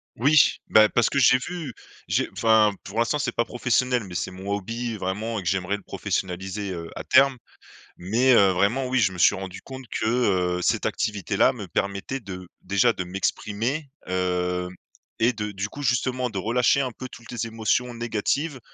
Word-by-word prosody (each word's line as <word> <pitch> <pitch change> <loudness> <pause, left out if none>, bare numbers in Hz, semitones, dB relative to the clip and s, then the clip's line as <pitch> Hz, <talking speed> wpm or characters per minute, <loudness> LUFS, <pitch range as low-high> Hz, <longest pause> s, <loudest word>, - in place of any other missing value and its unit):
Oui, 145 +5 +4
bah, 110 0 +6
parce 120 - +2
que 140 - +1
j'ai 130 -1 +6
vu, 155 0 -6 0.3
j'ai - - +1
enfin, 110 -2 +4
pour 100 - -8
l'instant 120 +6 +1
c'est 125 -4 -1
pas 120 - +1
professionnel, 125 0 0
mais 95 -2 -9
c'est - - -2
mon 95 +2 -8
hobby 115 +3 -3
vraiment 105 +4 -3
et - - -7
que - - -6
j'aimerais 95 +1 -1
le 105 - -17
professionnaliser, 95 +3 -3
heu, 85 -2 -6
à - - -5
terme. 135 0 +4 0.6
Mais, 115 +9 +2
heu, 100 -5 +6
vraiment 100 +8 +1
oui, 130 0 +1
je 95 -4 +2
me - - -8
suis 85 - +5
rendu 95 -1 -7
compte 130 -1 -9
que, - - -3 0.5
heu, - - -3
cette - - +1
activité-là 105 -4 +1
me - - -8
permettait 100 +7 -2
de 95 -5 -9
déjà 100 +6 +3
de 95 -5 -5
m'exprimer, 105 - -2 0.2
hem, 90 -1 -1 0.5
et 120 +3 +4
de 105 -2 -4
du 100 +2 -3
coup, 145 - -9
justement, 125 -1 0
de 105 - -6
relâcher 120 +7 +2
un 130 - -2
peu 130 +2 -8
toutes 120 -1 -13
les 115 -1 -3
émotions 115 +2 0
négatives 120 +6 -2
110 Hz, 190 wpm, -24 LUFS, 95-125 Hz, 0.6 s, bah